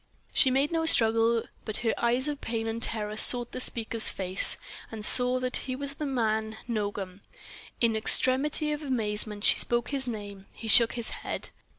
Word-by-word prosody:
She 265 - +3
made 270 +4 0
no 325 -1 -1
struggle, 225 -3 +3 0.2
but 215 - -4
her 225 - +1
eyes 245 +3 0
of 290 -1 -4
pain 225 -1 -4
and 225 +1 -5
terror 215 -2 -3
sought 240 +1 +3
the - - -6
speaker's 230 -2 +2
face, 185 -1 +4 0.3
and 215 -2 -3
saw 250 +2 +3
that 255 0 -1
he 255 - -5
was 280 +1 -4
the 295 +1 -6
man 220 -4 -2
Nogam. 205 -4 -5 0.6
In 230 -2 +1
extremity 270 +7 +2
of 300 0 -4
amazement 210 -6 -3
she - - +5
spoke 240 0 -1
his 270 -2 -2
name. 205 -4 -8
He 225 - -9
shook 230 +1 +5
his 235 -2 -5
head. - - -4
230 Hz, 180 wpm, -26 LUFS, 220-255 Hz, 0.6 s, she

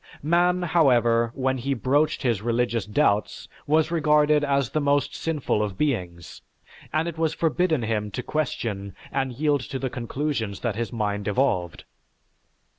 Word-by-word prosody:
Man, 175 +3 +2
however, 120 -9 +3
when 130 0 0
he 135 +3 -1
broached 145 +6 +1
his 115 -6 +1
religious 115 -2 0
doubts, 105 -2 0 0.2
was 155 +2 +2
regarded 150 -2 +3
as 140 -3 +1
the 155 - 0
most 145 0 +1
sinful 150 -9 -1
of 100 -3 -3
beings, 90 - -3 0.5
and 155 +2 0
it 165 -1 -5
was 160 -2 0
forbidden 165 -3 +1
him 105 -2 -1
to 115 +5 -5
question 110 -9 -3 0.2
and 135 -1 -1
yield 145 +2 +1
to 135 - -3
the 130 -1 -3
conclusions 120 -4 -3
that 115 -4 -1
his 115 +1 -3
mind 105 -3 -2
evolved. 100 -7 0
130 Hz, 150 wpm, -25 LUFS, 110-150 Hz, 0.5 s, however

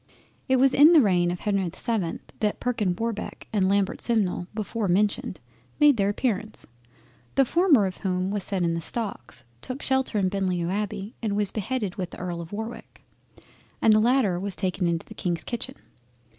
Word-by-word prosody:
It 260 - +5
was 260 +1 +4
in 300 +5 +7
the 325 - +8
reign 180 -6 +3
of 175 0 -4
Henry 200 -3 0
the - - -15
7th 205 -8 -2 0.2
that 210 -2 0
Perkin 215 -7 0
Warbeck 225 +1 -4
and 190 -3 +2
Lambert 200 -1 +1
Simnel 200 -6 0
before 215 0 -2
mentioned 190 -1 0 0.4
made 295 -4 +6
their 200 -1 +2
appearance, 215 -1 -2 0.7
the 270 - +5
former 315 - +4
of 185 -1 -4
whom 185 -1 -1
was 205 -2 -2
set 190 -2 -1
in 170 -1 +1
the 165 - -2
stocks, 165 - -4 0.2
took 255 +3 -5
shelter 265 -4 +1
in 195 -2 +2
Beaulieu 185 -3 -1
Abbey, 205 +1 -3
and 215 -3 -1
was 205 -2 +3
beheaded 215 -2 -3
with 180 -3 -3
the - - -11
Earl 175 -2 -4
of 165 - -10
Warwick, 220 +3 -7 0.8
and 220 - +5
the 215 - +5
latter 225 -6 +2
was 195 0 -3
taken 185 -2 -1
into 170 -1 -1
the - - -11
Kings 175 -2 -2
kitchen. 250 +2 -5
205 Hz, 185 wpm, -25 LUFS, 185-230 Hz, 0.8 s, the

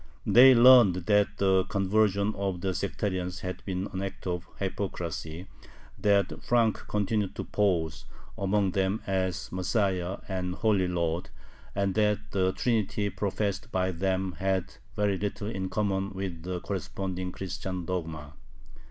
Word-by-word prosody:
They 130 +2 +8
learned 120 -6 +8
that 105 0 +4
the 95 -1 +3
conversion 100 +1 +1
of 95 -3 -3
the 95 0 -1
sectarians 95 -2 -2
had 90 0 -5
been 95 0 -2
an 95 - -3
act 95 0 -6
of 90 -1 -3
hypocrisy, 90 -4 -4 0.5
that 100 -1 +1
Frank 115 -3 +2
continued 105 -1 -1
to - - -3
pose 85 -6 0 0.3
among 100 0 +1
them 95 +3 0
as 95 -2 -1
Messiah 95 -1 0
and 90 -2 -3
"Holy 100 -4 +2
Lord," 85 +1 -1 0.5
and 100 -1 +1
that 105 0 +1
the 95 -1 +2
Trinity 105 -2 0
professed 100 +3 -2
by 95 0 +1
them 95 +1 -1
had 95 -1 0 0.2
very 100 -3 +1
little 105 0 -3
in 95 -2 -3
common 100 -1 -1
with 95 -3 -5
the 90 +1 -4
corresponding 95 -1 -4
Christian 95 -1 -5
dogma. 80 -5 -4
95 Hz, 135 wpm, -28 LUFS, 90-100 Hz, 0.5 s, They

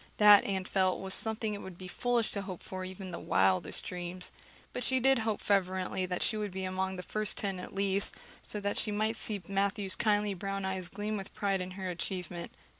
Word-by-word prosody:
That, 210 -1 +9
Anne 190 -2 0
felt, 185 -1 +2
was 190 0 0
something 220 0 +1
it 205 - -5
would 185 -2 -9
be 185 - -7
foolish 240 +4 +1
to 200 - -2
hope 190 -3 -7
for 185 0 -5
even 185 0 -6
in - - -7
the 170 - -5
wildest 95 -1 +2
dreams. 180 0 -3 0.4
But 250 - -2
she 260 +2 +3
did 265 0 +5
hope 220 -2 0
fervently 185 -1 +1
that 180 0 0
she 215 - +1
would 210 -1 -2
be 190 0 -4
among 190 0 -1
the 180 - -6
first 215 +1 +2
ten 195 -3 -1
at 180 - -8
least, 195 0 0 0.3
so 210 - -4
that 200 0 0
she - - +3
might 215 +2 0
see 210 -3 -3
Matthew's 195 0 +1
kindly 210 +1 +2
brown 195 +1 -3
eyes 190 -2 -2
gleam 210 +2 -3
with 195 0 -8
pride 200 -3 0
in 180 - -4
her 190 -1 -3
achievement. 175 0 -4
195 Hz, 220 wpm, -31 LUFS, 185-210 Hz, 0.4 s, That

